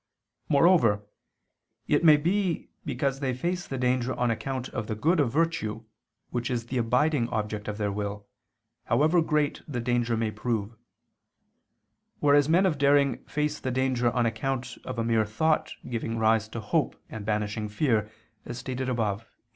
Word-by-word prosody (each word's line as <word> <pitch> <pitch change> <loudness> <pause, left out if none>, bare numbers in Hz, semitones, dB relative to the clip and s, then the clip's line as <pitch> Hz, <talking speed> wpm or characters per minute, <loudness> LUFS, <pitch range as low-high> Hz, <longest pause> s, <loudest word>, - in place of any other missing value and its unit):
Moreover, 140 - +4 0.8
it - - +2
may 155 -3 +8
be 180 +2 -1
because 135 -2 -1
they 130 -3 -1
face 175 +7 -2
the 135 - -4
danger 125 0 0
on 120 -1 +1
account 130 +2 -3
of 110 -3 -4
the 110 - -2
good 160 +11 +2
of 135 -5 +2
virtue 130 -8 0 0.5
which 120 -1 -2
is 120 -2 -2
the 125 +1 -2
abiding 125 +2 +2
object 105 -1 -3
of 105 -1 -3
their 105 -1 -1
will, 100 0 -4 0.6
however 155 +8 +3
great 150 -2 0
the 130 -5 -3
danger 120 -1 0
may 110 -1 0
prove: 110 0 -3 1.4
whereas 145 0 +4
men 180 +4 +4
of 155 -7 +1
daring 140 -2 +3
face 150 0 -2
the 130 - -3
danger 130 -1 +1
on 120 0 +1
account 125 +3 -2
of 130 - -5
a 115 - 0
mere 115 -1 +2
thought 155 +9 +1
giving 115 -1 -3
rise 110 0 +3
to 115 +1 -6
hope 105 - 0
and 110 - -7
banishing 105 0 -2
fear, 110 -1 +1 0.3
as 120 - -7
stated 130 +1 -3
above 110 -4 -1
(A. - - -24
125 Hz, 165 wpm, -27 LUFS, 110-145 Hz, 1.4 s, may